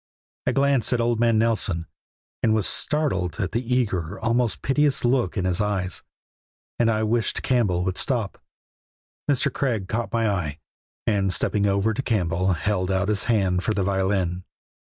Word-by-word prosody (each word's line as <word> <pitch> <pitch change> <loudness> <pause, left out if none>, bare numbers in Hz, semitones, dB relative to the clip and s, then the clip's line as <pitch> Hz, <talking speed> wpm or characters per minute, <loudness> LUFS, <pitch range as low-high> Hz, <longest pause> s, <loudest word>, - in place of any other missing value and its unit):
I - - +4
glanced 135 -2 +2
at 120 - +1
old 115 -1 +1
man 115 -1 +3
Nelson, 105 -7 +1 0.6
and 110 -1 +3
was 110 -3 +1
startled 130 - 0
at 95 -3 -1
the 115 - -1
eager, 100 -7 0
almost 115 -2 0
piteous 140 -1 +2
look 120 -5 +1
in 95 - 0
his 90 +2 +1
eyes, 95 -4 -1 0.8
and 115 -1 +3
I 110 -1 +1
wished 115 +1 0
Campbell 100 -9 +1
would 95 0 -1
stop. 120 -7 -1 0.9
Mr. 140 -3 +2
Craig 115 -9 -1
caught 115 +3 -2
my 115 -1 +1
eye, 85 -8 -2 0.5
and 100 -3 +1
stepping 100 +3 +1
over 100 +3 +1
to 115 - -2
Campbell 90 -6 0
held 90 +2 -1
out 95 +1 0
his 105 -2 0
hand 95 -6 +1
for 110 - 0
the 100 - +1
violin. 95 -2 0
105 Hz, 165 wpm, -24 LUFS, 95-120 Hz, 0.9 s, I